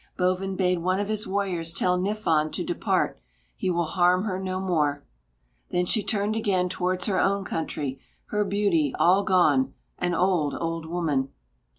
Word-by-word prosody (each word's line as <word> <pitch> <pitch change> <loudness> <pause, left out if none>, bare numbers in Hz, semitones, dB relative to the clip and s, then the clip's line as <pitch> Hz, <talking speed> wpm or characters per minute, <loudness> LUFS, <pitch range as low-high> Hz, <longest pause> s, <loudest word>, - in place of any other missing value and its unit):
Bovin 185 +1 0
bade 180 -2 +1
one 185 +3 0
of 205 0 -2
his 215 +1 -1
warriors 190 -4 -1
tell 180 +2 +1
Niffon 180 -5 0
to - - -2
depart; - - 0 0.4
he - - -2
will 170 -1 +1
harm 180 +2 +3
her 190 -3 -2
no 185 -1 -3
more. 150 -6 0 0.6
Then 180 0 +1
she 215 +4 +1
turned 205 +1 -1
again 190 -5 +1
towards 180 0 -1
her 190 -3 +1
own 195 0 +1
country, 145 -5 -3 0.3
her 210 0 +2
beauty 195 -8 +1
all 190 +3 +4
gone, 195 +8 +3 0.2
an 175 -1 0
old 175 -5 +1
old 165 -1 -3
woman. 155 -6 -1
185 Hz, 165 wpm, -26 LUFS, 165-195 Hz, 0.6 s, all